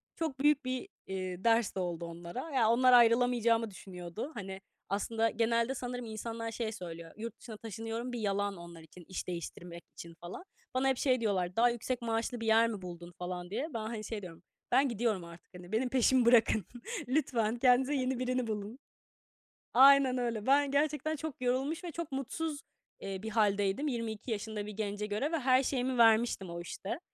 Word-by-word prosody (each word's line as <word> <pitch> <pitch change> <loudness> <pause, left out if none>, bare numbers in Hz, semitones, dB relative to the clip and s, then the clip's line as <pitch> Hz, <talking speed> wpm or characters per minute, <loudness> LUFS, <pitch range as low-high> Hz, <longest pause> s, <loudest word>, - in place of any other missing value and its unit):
Çok 315 -6 -3
büyük 290 -1 +3
bir, 255 +8 -3 0.2
eee, 185 -1 -4
ders 230 -2 +3
de - - -2
oldu 175 -2 -3
onlara. 170 - -7
Ya, 235 -5 +3
onlar 250 +2 +5
ayrılamayacağımı 235 -1 +4
düşünüyordu. 185 - -7
Hani, 195 -2 -7 0.3
aslında 225 +3 0
genelde 230 +3 +1
sanırım 245 -1 -4
insanlar 225 +1 -5
şey 225 -1 -3
söylüyor. 170 -4 -8
"Yurt 230 +1 -6
dışına 220 -3 -9
taşınıyorum." 225 +3 -5
bir 240 - -3
yalan 200 -2 -1
onlar 170 -1 -10
için, 165 +2 -15
iş 185 - -5
değiştirmek 170 0 -6
için 170 0 -9
falan. 175 - -7 0.3
Bana 260 +1 +2
hep 265 -2 +2
şey 255 -3 +2
diyorlar, 185 -4 0
"Daha 240 +1 +5
yüksek 240 +1 -3
maaşlı 230 +1 -1
bir 225 - -4
yer 225 +1 +5
mi 215 -4 -4
buldun?" 175 -1 -8
falan 180 -1 -5
diye. 270 +9 -2
Ben, 230 - -2
hani, 220 0 -4
şey 215 -1 -4
diyorum, 175 -1 -10 0.3
"Ben 270 +2 +4
gidiyorum 220 -5 0
artık, 170 0 -13
hani, 180 +1 -11
benim 245 +3 +1
peşimi 255 0 +4
bırakın. 225 -4 +5 0.4
Lütfen 245 -5 +1
kendinize 255 +3 +4
yeni 255 -1 0
birini 255 -1 0
bulun." 215 +3 -4 0.9
Aynen 270 0 +7
öyle. 235 -4 -2
Ben 280 +1 +4
gerçekten 300 +2 +1
çok 305 -3 -6
yorulmuş 265 +7 0
ve 345 - -5
çok 335 -2 -5
mutsuz, 285 +3 -3 0.4
eee, 195 -1 -5
bir 220 - -3
hâldeydim, 205 +4 +1
22 230 -2 -3
yaşında 210 0 -3
bir 210 - -6
gence 205 0 -3
göre 215 +10 -1
ve 330 - 0
her 260 0 +4
şeyimi 255 -1 -1
vermiştim 225 -4 +4
o 170 0 -5
işte, 190 - -5
230 Hz, 180 wpm, -32 LUFS, 195-255 Hz, 0.9 s, Aynen